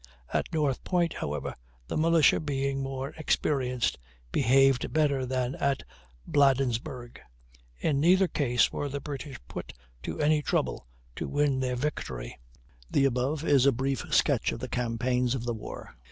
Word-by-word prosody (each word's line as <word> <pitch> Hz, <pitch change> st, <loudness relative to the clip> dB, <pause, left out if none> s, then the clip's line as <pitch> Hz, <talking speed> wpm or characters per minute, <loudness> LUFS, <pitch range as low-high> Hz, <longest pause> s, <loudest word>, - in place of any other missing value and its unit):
At -, -, 0 dB
North 145 Hz, -5 st, 0 dB
Point, 175 Hz, -3 st, +1 dB
however, 75 Hz, -1 st, -4 dB, 0.3 s
the -, -, -4 dB
militia, 160 Hz, -2 st, +4 dB
being 140 Hz, -2 st, -1 dB
more 135 Hz, 0 st, -4 dB
experienced, 125 Hz, -, 0 dB, 0.3 s
behaved 135 Hz, -, +3 dB
better 140 Hz, -4 st, +1 dB
than 130 Hz, 0 st, -1 dB
at 140 Hz, -1 st, 0 dB, 0.4 s
Bladensburg. 130 Hz, -2 st, +1 dB, 0.6 s
In 145 Hz, -3 st, 0 dB
neither 185 Hz, +5 st, +5 dB
case 125 Hz, -8 st, +2 dB
were 145 Hz, -, -3 dB
the 140 Hz, +1 st, -3 dB
British 140 Hz, 0 st, -6 dB
put -, -, -7 dB, 0.3 s
to -, -, -5 dB
any 150 Hz, 0 st, +3 dB
trouble 65 Hz, -, -1 dB, 0.3 s
to -, -, -3 dB
win 145 Hz, -2 st, +1 dB
their 125 Hz, -1 st, -1 dB
victory. 95 Hz, -, -4 dB, 0.5 s
The 140 Hz, -, +3 dB
above 135 Hz, +4 st, 0 dB
is 140 Hz, -4 st, +4 dB
a -, -, +7 dB
brief 135 Hz, +2 st, -2 dB
sketch -, -, +3 dB
of -, -, -4 dB
the 130 Hz, -, -4 dB
campaigns 125 Hz, +1 st, 0 dB
of 125 Hz, -, -4 dB
the 120 Hz, -1 st, -1 dB
war. 110 Hz, -, -8 dB
135 Hz, 150 wpm, -28 LUFS, 125-145 Hz, 0.6 s, a